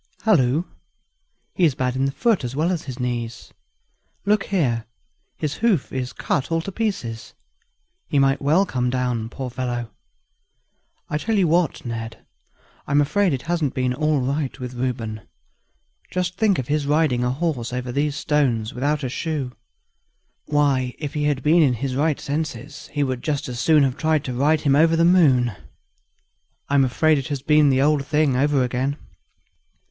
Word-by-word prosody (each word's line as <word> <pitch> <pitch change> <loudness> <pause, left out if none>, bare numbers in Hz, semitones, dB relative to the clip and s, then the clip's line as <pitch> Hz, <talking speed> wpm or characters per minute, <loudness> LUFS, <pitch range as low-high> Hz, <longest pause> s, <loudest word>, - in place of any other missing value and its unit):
"Halloo! 155 - +3 0.9
he's 165 -7 +2
bad 125 -2 -1
in 135 +1 +1
his 135 - -3
foot 230 - +2
as 125 +1 -4
well 160 +5 +1
as 175 -4 -3
his 130 -1 -7
knees. 120 -2 -4 0.7
Look 210 0 +2
here 125 - 0 0.5
his 150 -3 -3
hoof 215 - +1
is 130 -1 -3
cut 145 +2 -2
all 165 - +2
to 195 - -6
pieces; 125 - -4 0.7
he 145 - -1
might 135 0 +3
well 155 +8 +3
come 125 -8 -1
down, 125 -3 -1
poor 130 0 -6
fellow! 120 -2 -3 1.2
I 150 - -2
tell 225 +5 0
you 185 -3 +3
what, 165 -2 +1
Ned, 115 -1 -6 0.6
I'm 145 +1 +3
afraid 190 +6 +2
it 130 -3 -2
hasn't 165 -5 -1
been 130 -1 0
all 150 0 +1
right 140 +2 -2
with 125 -1 -6
Reuben. 120 -4 -3 0.9
Just 180 0 -2
think 205 -1 +2
of 130 - -3
his 150 -1 0
riding 145 -5 +2
a 125 - +1
horse 130 -4 -2
over 125 0 -3
these 145 +2 0
stones 135 -7 0
without 145 +4 -1
a - - 0
shoe! 145 -2 -3 1.0
Why, 140 -4 +1
if 145 -3 -5
he 150 -1 -1
had 145 -3 0
been 165 +3 +5
in 135 -5 +3
his 130 +2 -3
right 150 +1 +1
senses 145 -2 -5
he 145 -1 0
would 130 -2 -2
just 150 0 -2
as 125 -2 -5
soon 155 +1 +4
have 135 -1 0
tried 155 -2 +1
to 130 - -4
ride 150 +5 +2
him 140 -2 +3
over 165 +2 +4
the 165 +1 +3
moon. 140 -9 +4 1.2
I'm 140 -1 +4
afraid 155 +4 +2
it 135 - -5
has 140 -3 -4
been 150 -1 +4
the 135 0 +3
old 150 -1 +2
thing 150 -3 +2
over 140 0 +2
again. 130 +3 -1
140 Hz, 175 wpm, -22 LUFS, 125-155 Hz, 1.2 s, been